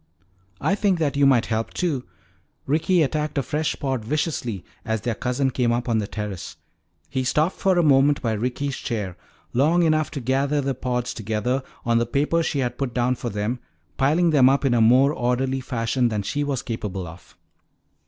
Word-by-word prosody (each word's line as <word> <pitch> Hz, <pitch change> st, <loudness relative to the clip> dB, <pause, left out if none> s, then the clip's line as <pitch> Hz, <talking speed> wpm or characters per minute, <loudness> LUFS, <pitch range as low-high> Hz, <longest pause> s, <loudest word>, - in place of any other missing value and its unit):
"I -, -, +1 dB
think 200 Hz, -2 st, +2 dB
that 150 Hz, -3 st, 0 dB
you 140 Hz, -1 st, +4 dB
might 125 Hz, -4 st, +4 dB
help 110 Hz, 0 st, -2 dB
too." 150 Hz, -8 st, -1 dB, 0.6 s
Ricky 165 Hz, +4 st, +2 dB
attacked 150 Hz, +1 st, -2 dB
a 140 Hz, -, +1 dB
fresh 150 Hz, +3 st, -1 dB
pod 130 Hz, -5 st, -2 dB
viciously 125 Hz, -, -2 dB, 0.2 s
as 110 Hz, -2 st, -2 dB
their 120 Hz, -, -1 dB
cousin 125 Hz, +4 st, -1 dB
came 120 Hz, -2 st, +1 dB
up 120 Hz, +1 st, -1 dB
on 115 Hz, -2 st, +2 dB
the 105 Hz, -, -2 dB
terrace. 105 Hz, -4 st, -6 dB, 0.5 s
He 130 Hz, -1 st, -2 dB
stopped 155 Hz, +7 st, +1 dB
for 190 Hz, -2 st, +2 dB
a 175 Hz, -, +4 dB
moment 140 Hz, 0 st, +4 dB
by 115 Hz, -4 st, -1 dB
Ricky's 125 Hz, +5 st, -2 dB
chair, 105 Hz, -7 st, -3 dB, 0.4 s
long 155 Hz, +8 st, +3 dB
enough 155 Hz, -2 st, +2 dB
to 145 Hz, -, -5 dB
gather 135 Hz, +3 st, +1 dB
the 135 Hz, -1 st, 0 dB
pods 125 Hz, -1 st, -2 dB
together 110 Hz, +4 st, -1 dB, 0.2 s
on 115 Hz, -1 st, +3 dB
the 120 Hz, -, 0 dB
paper 150 Hz, +6 st, +1 dB
she 155 Hz, -, -1 dB
had 125 Hz, -2 st, -2 dB
put 135 Hz, -4 st, -2 dB
down 125 Hz, 0 st, +2 dB
for 120 Hz, -1 st, -4 dB
them, 105 Hz, +4 st, -2 dB, 0.4 s
piling 160 Hz, +5 st, +3 dB
them 135 Hz, -4 st, +6 dB
up 140 Hz, +1 st, +2 dB
in 130 Hz, -, +3 dB
a 120 Hz, -, +3 dB
more 130 Hz, +6 st, +5 dB
orderly 130 Hz, +1 st, 0 dB
fashion 120 Hz, 0 st, 0 dB
than 105 Hz, -2 st, -2 dB
she 145 Hz, +8 st, -1 dB
was 140 Hz, -3 st, -2 dB
capable 105 Hz, -5 st, -4 dB
of. 85 Hz, +1 st, -13 dB
130 Hz, 190 wpm, -23 LUFS, 115-145 Hz, 0.6 s, them